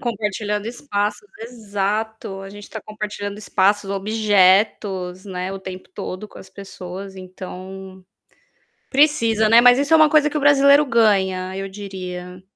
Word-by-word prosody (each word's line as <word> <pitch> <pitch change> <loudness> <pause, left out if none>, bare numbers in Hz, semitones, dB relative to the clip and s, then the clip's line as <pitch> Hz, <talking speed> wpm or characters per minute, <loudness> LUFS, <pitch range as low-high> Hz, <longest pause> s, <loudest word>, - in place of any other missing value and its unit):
Compartilhando 210 -3 -3
espaços 230 - -3
exato, 215 -2 -4
a 195 - -9
gente 205 0 -11
tá 220 - -7
compartilhando 210 -1 -6
espaços, 200 0 +1
objetos, 195 -2 +1
né, 185 -1 -5
o 195 - -6
tempo 185 -1 -9
todo 185 +2 -6
com - - -17
as - - -14
pessoas, 190 0 -9
então, 185 0 -10 0.9
precisa, 230 -7 +3
né. 230 +1 +8
Mas 245 0 +7
isso 285 +3 +1
é - - +8
uma 310 -1 +6
coisa 300 0 +4
que 300 - -3
o - - 0
brasileiro 285 0 +5
ganha, 190 -6 +1
eu 195 0 -4
diria. 185 -2 -8
205 Hz, 145 wpm, -21 LUFS, 190-225 Hz, 0.9 s, né